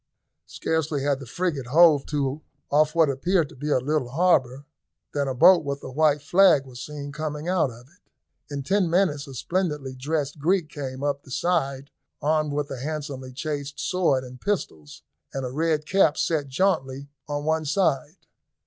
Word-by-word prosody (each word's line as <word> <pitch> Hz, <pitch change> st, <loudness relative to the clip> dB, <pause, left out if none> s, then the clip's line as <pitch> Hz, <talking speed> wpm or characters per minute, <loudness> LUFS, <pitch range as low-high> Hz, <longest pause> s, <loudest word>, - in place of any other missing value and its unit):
Scarcely 155 Hz, -3 st, -2 dB
had 140 Hz, -1 st, +1 dB
the 135 Hz, -, -9 dB
frigate 150 Hz, -2 st, -2 dB
hove 155 Hz, 0 st, +5 dB
to 145 Hz, 0 st, -2 dB, 0.3 s
off 155 Hz, +2 st, +3 dB
what 165 Hz, -2 st, +5 dB
appeared 155 Hz, +4 st, +1 dB
to -, -, -14 dB
be 145 Hz, +4 st, -4 dB
a 145 Hz, -, +3 dB
little 135 Hz, 0 st, -1 dB
harbour, 140 Hz, -4 st, +2 dB, 0.5 s
than 140 Hz, -1 st, 0 dB
a 130 Hz, -, -2 dB
boat 170 Hz, +6 st, +7 dB
with 140 Hz, -1 st, -4 dB
a 130 Hz, -, -7 dB
white 150 Hz, 0 st, +2 dB
flag 175 Hz, -4 st, +5 dB
was 125 Hz, -1 st, -10 dB
seen 145 Hz, -1 st, -7 dB
coming 150 Hz, +1 st, -4 dB
out 180 Hz, -6 st, +2 dB
of 120 Hz, +1 st, -13 dB
it. -, -, -27 dB, 0.5 s
In 140 Hz, -1 st, -4 dB
ten 190 Hz, +4 st, +1 dB
minutes 165 Hz, -5 st, +1 dB
a 135 Hz, -, -9 dB
splendidly 150 Hz, -, -2 dB
dressed 145 Hz, +2 st, -3 dB
Greek 170 Hz, +1 st, +1 dB
came 135 Hz, -3 st, -6 dB
up 145 Hz, -1 st, -1 dB
the -, -, -18 dB
side 140 Hz, -3 st, -1 dB, 0.3 s
armed 155 Hz, 0 st, +1 dB
with 145 Hz, 0 st, -2 dB
a 130 Hz, -, -5 dB
handsomely 140 Hz, -2 st, -5 dB
chased 145 Hz, +1 st, -5 dB
sword 170 Hz, -8 st, +1 dB
and 125 Hz, 0 st, -11 dB
pistols, 80 Hz, -, -4 dB, 0.3 s
and 135 Hz, -1 st, -2 dB
a 125 Hz, -, -4 dB
red 155 Hz, +1 st, 0 dB
cap 185 Hz, -4 st, +3 dB
set 155 Hz, -4 st, 0 dB
jauntily 140 Hz, -3 st, 0 dB, 0.2 s
on 145 Hz, 0 st, -3 dB
one 160 Hz, 0 st, 0 dB
side. 155 Hz, -1 st, 0 dB
145 Hz, 175 wpm, -25 LUFS, 135-160 Hz, 0.5 s, boat